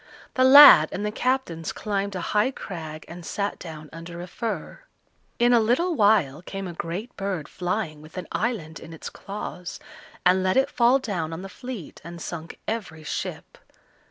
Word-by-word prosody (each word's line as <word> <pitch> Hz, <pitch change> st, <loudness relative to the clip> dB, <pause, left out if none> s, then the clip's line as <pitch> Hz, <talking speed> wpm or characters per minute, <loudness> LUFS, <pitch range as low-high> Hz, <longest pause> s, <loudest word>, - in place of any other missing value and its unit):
The 255 Hz, -, +3 dB
lad 280 Hz, +2 st, +10 dB
and 205 Hz, -, -3 dB
the 210 Hz, -, -1 dB
captains 235 Hz, -10 st, -1 dB
climbed 200 Hz, -2 st, -2 dB
a 180 Hz, -, -3 dB
high 210 Hz, +4 st, +3 dB
crag 160 Hz, -11 st, -7 dB
and 175 Hz, +1 st, -9 dB
sate 200 Hz, +4 st, -3 dB
down 155 Hz, -3 st, -9 dB
under 165 Hz, +1 st, -8 dB
a 175 Hz, -, -5 dB
fir. 225 Hz, +4 st, -5 dB, 0.6 s
In 240 Hz, +1 st, +4 dB
a 240 Hz, -, +6 dB
little 255 Hz, +11 st, +2 dB
while 205 Hz, -, +3 dB
came 195 Hz, +1 st, -6 dB
a 175 Hz, -, -6 dB
great 175 Hz, +9 st, -5 dB
bird 195 Hz, -6 st, -3 dB
flying 180 Hz, -4 st, -3 dB
with 155 Hz, +4 st, -13 dB
an 180 Hz, -, -4 dB
island 205 Hz, -9 st, -2 dB
in 165 Hz, -, -11 dB
its 160 Hz, -, -8 dB
claws, 195 Hz, -3 st, -7 dB, 0.5 s
and 185 Hz, +1 st, +5 dB
let 185 Hz, +5 st, +1 dB
it 270 Hz, +1 st, +3 dB
fall 245 Hz, +2 st, +4 dB
down 185 Hz, -11 st, -3 dB
on 170 Hz, +3 st, -6 dB
the 195 Hz, -, -7 dB
fleet, 245 Hz, -, -8 dB
and 170 Hz, +1 st, -9 dB
sunk 165 Hz, 0 st, -7 dB
every 190 Hz, -9 st, -4 dB
ship. -, -, -5 dB
190 Hz, 180 wpm, -25 LUFS, 165-225 Hz, 0.6 s, lad